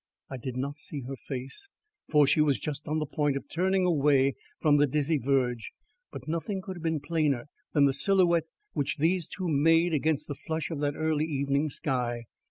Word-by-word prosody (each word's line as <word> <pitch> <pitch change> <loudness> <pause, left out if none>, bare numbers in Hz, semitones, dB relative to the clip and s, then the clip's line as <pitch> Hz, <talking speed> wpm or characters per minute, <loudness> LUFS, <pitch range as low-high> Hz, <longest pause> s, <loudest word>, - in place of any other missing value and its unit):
I 130 - -4
did 125 +1 -5
not 140 +3 -3
see 145 -1 -6
her 135 +2 -6
face, 135 - -7 0.4
for 150 -2 +5
she 150 - +3
was 140 -6 +2
just 150 +3 -5
on 155 +1 0
the 155 - -1
point 145 -1 0
of - - -8
turning 185 +3 +1
away 140 -5 +3 0.3
from 150 -2 +4
the 145 0 +4
dizzy 150 +2 +1
verge, 125 -3 0 0.4
but - - -9
nothing 170 +5 -2
could 190 -1 -7
have - - -9
been 160 -1 0
plainer 145 -3 0 0.2
than 145 -2 +5
the 135 - +3
silhouette 170 +2 +3 0.3
which 140 - -1
these 170 +2 +1
two 185 -2 -4
made 165 +3 +3
against 155 0 0
the 145 - -3
flush 160 +4 -4
of 155 - -3
that 145 0 0
early 155 -1 0
evening 140 0 0
sky. 120 -4 -2
150 Hz, 195 wpm, -28 LUFS, 140-160 Hz, 0.4 s, for